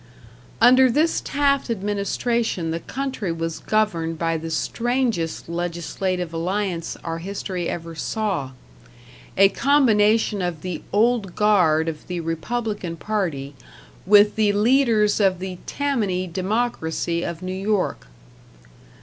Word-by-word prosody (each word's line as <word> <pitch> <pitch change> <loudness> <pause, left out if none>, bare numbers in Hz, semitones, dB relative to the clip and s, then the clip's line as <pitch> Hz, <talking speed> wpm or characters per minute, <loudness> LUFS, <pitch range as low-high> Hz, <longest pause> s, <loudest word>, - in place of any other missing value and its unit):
Under 255 +1 +6
this 305 +7 +2
Taft 280 -2 +1
administration 205 -2 -1
the 165 - -2
country 260 -3 -4
was 165 0 -3
governed 170 -7 0
by 165 0 0
the 165 0 -4
strangest 230 0 -1
legislative 175 +1 -3
alliance 180 0 -2
our 165 0 -4
history 185 -1 -4
ever 165 -1 -5
saw; 190 -4 -2 0.9
a 195 +1 +7
combination 220 -5 +3
of 175 -4 -3
the 180 -3 -4
Old 215 -3 +1
Guard 180 -7 +3
of 155 -2 -5
the 180 -1 -3
Republican 180 +2 -3
Party 165 -10 -2 0.5
with 205 +1 +6
the 215 -2 +3
leaders 220 -1 +3
of 190 -3 +3
the 185 0 -6
Tammany 215 -11 -1
Democracy 185 -3 -1
of 170 0 -5
New 185 0 -3
York. 195 - -1
195 Hz, 115 wpm, -23 LUFS, 170-220 Hz, 0.9 s, a